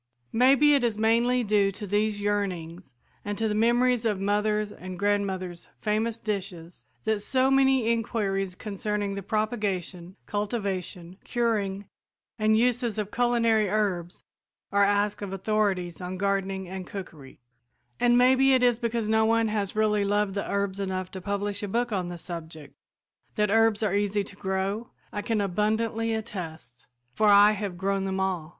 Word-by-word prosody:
Maybe 275 Hz, +5 st, +5 dB
it 280 Hz, -3 st, +3 dB
is 230 Hz, -3 st, 0 dB
mainly 235 Hz, +3 st, +2 dB
due 205 Hz, -2 st, +2 dB
to 210 Hz, -, -7 dB
these 205 Hz, +1 st, 0 dB
yearnings 180 Hz, -7 st, -3 dB, 0.3 s
and 205 Hz, 0 st, -4 dB
to 225 Hz, -, 0 dB
the 210 Hz, -, -1 dB
memories 240 Hz, +2 st, +2 dB
of 210 Hz, -4 st, 0 dB
mother's 210 Hz, +1 st, 0 dB
and 185 Hz, -2 st, -8 dB
grandmother's 190 Hz, -3 st, -2 dB
famous 220 Hz, +2 st, -1 dB
dishes 180 Hz, -, -5 dB, 0.2 s
that 220 Hz, -1 st, 0 dB
so 260 Hz, +3 st, +1 dB
many 265 Hz, -3 st, +3 dB
inquiries 200 Hz, -5 st, -1 dB
concerning 205 Hz, 0 st, -3 dB
the 200 Hz, -, -4 dB
propagation, 195 Hz, -4 st, -2 dB
cultivation, 195 Hz, -4 st, -3 dB
curing 205 Hz, -5 st, -1 dB, 0.5 s
and 215 Hz, 0 st, +3 dB
uses 240 Hz, -1 st, +1 dB
of 210 Hz, -1 st, -3 dB
culinary 230 Hz, -4 st, +2 dB
herbs 190 Hz, -4 st, -1 dB, 0.5 s
are 200 Hz, 0 st, +4 dB
asked 205 Hz, +1 st, +1 dB
of 195 Hz, -2 st, -5 dB
authorities 195 Hz, -3 st, -1 dB
on 180 Hz, +1 st, -5 dB
gardening 195 Hz, -1 st, -1 dB
and 185 Hz, 0 st, -7 dB
cookery; 160 Hz, -9 st, -9 dB, 0.6 s
and 240 Hz, 0 st, +4 dB
maybe 260 Hz, +2 st, +5 dB
it 255 Hz, -, +2 dB
is 245 Hz, -2 st, +3 dB
because 235 Hz, -2 st, -1 dB
no 220 Hz, 0 st, +3 dB
one 225 Hz, 0 st, +2 dB
has 205 Hz, -2 st, -2 dB
really 210 Hz, -1 st, +2 dB
loved 205 Hz, 0 st, +1 dB
the 200 Hz, -, -3 dB
herbs 200 Hz, -1 st, -1 dB
enough 185 Hz, -1 st, -3 dB
to 190 Hz, -, -7 dB
publish 200 Hz, +1 st, -3 dB
a 205 Hz, -, -3 dB
book 235 Hz, +4 st, -1 dB
on 185 Hz, -4 st, -1 dB
the 175 Hz, 0 st, -6 dB
subject. 160 Hz, -4 st, -8 dB, 0.6 s
That 210 Hz, -1 st, +1 dB
herbs 225 Hz, -1 st, +3 dB
are 205 Hz, -3 st, +1 dB
easy 205 Hz, 0 st, +1 dB
to 200 Hz, -, -12 dB
grow 195 Hz, +3 st, -2 dB, 0.2 s
I 205 Hz, -, -2 dB
can 225 Hz, 0 st, -1 dB
abundantly 220 Hz, +3 st, 0 dB
attest, 165 Hz, -, -7 dB, 0.3 s
for 215 Hz, +11 st, +2 dB
I 205 Hz, +1 st, +7 dB
have 200 Hz, -4 st, -4 dB
grown 195 Hz, +1 st, -1 dB
them 190 Hz, 0 st, -2 dB
all. 185 Hz, -5 st, -1 dB
205 Hz, 160 wpm, -27 LUFS, 190-220 Hz, 0.6 s, I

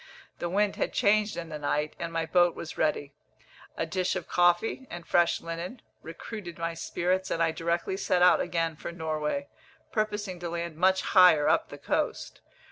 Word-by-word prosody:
The 175 Hz, -, -2 dB
wind 200 Hz, +2 st, +1 dB
had -, -, -1 dB
changed 210 Hz, +1 st, +2 dB
in 165 Hz, -1 st, -5 dB
the 155 Hz, -1 st, -6 dB
night, 150 Hz, +1 st, -1 dB
and 170 Hz, -1 st, -4 dB
my 165 Hz, 0 st, -1 dB
boat 175 Hz, +1 st, +3 dB
was 160 Hz, -, -7 dB
ready. 145 Hz, -2 st, -1 dB, 0.6 s
A -, -, 0 dB
dish 185 Hz, -1 st, -1 dB
of 185 Hz, -, -4 dB
coffee, 175 Hz, +9 st, +2 dB
and 175 Hz, -1 st, -8 dB
fresh 175 Hz, -1 st, +2 dB
linen, 170 Hz, +8 st, -6 dB, 0.2 s
recruited 175 Hz, +2 st, -8 dB
my 165 Hz, 0 st, -2 dB
spirits, 180 Hz, +3 st, -1 dB
and -, -, -1 dB
I 165 Hz, -, +2 dB
directly 170 Hz, +3 st, -2 dB
set 180 Hz, -2 st, +2 dB
out 180 Hz, -, +6 dB
again 165 Hz, -2 st, -1 dB
for 160 Hz, -, -7 dB
Norway, 160 Hz, -, -3 dB, 0.4 s
purposing 210 Hz, -4 st, -2 dB
to 175 Hz, -1 st, -4 dB
land 170 Hz, -1 st, -4 dB
much 190 Hz, +3 st, +3 dB
higher 180 Hz, -6 st, +6 dB
up -, -, +2 dB
the -, -, -9 dB
coast. -, -, -2 dB
175 Hz, 180 wpm, -28 LUFS, 165-190 Hz, 0.6 s, out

